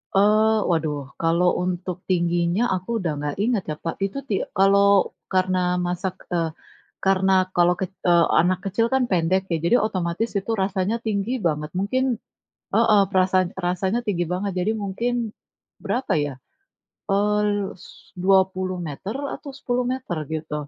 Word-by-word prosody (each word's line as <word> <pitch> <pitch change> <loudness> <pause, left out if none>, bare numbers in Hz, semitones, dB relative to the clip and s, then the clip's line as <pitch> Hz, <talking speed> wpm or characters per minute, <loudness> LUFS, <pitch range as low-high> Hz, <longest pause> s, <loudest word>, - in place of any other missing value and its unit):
Oh. 215 +2 +4
Waduh, 150 -5 -1
kalau 170 +2 +3
untuk 180 0 -3
tingginya 175 +2 +1
aku 185 +3 -4
udah 175 -4 -1
nggak 145 0 -3
ingat 225 -5 +1
ya, 155 - -2
Pak. 165 - -2
Itu 200 +7 -5
ti - - 0 0.2
kalau 200 0 +4 0.2
karena 185 0 +2 0.3
masak 180 +1 -2 0.2
eee, 165 -2 +1 0.5
karena 190 0 +3 0.2
kalau 175 0 +4
kec 190 0 -3 0.2
eee, 170 -1 +5 0.2
anak 180 +1 +1
kecil 200 +4 +1
kan 265 -1 +3
pendek, 185 +1 +2
ya 165 - +2
jadi 235 - +4
otomatis 185 +2 -1
itu 195 +4 -2
rasanya 190 +2 0
tinggi 210 +1 -1
banget, 150 -1 0
mungkin 255 +7 0 0.7
heeh, 220 -2 +5
perasaan 185 -1 +3 0.2
rasanya 190 +5 0
tinggi 175 -4 0
banget. 195 +2 -2
Jadi 215 - +1
mungkin, 230 +5 -2 0.7
berapa 255 +1 -1
ya? 145 - -4 0.8
Eee, 210 +1 +2
l - - +2 0.3
s - - -12 0.4
20 185 -1 +2
meter 190 +9 -6 0.2
atau 285 - -9
10 245 -2 -1
meter 255 -10 -4 0.2
gitu. 155 -1 -4
185 Hz, 150 wpm, -23 LUFS, 175-205 Hz, 0.8 s, eee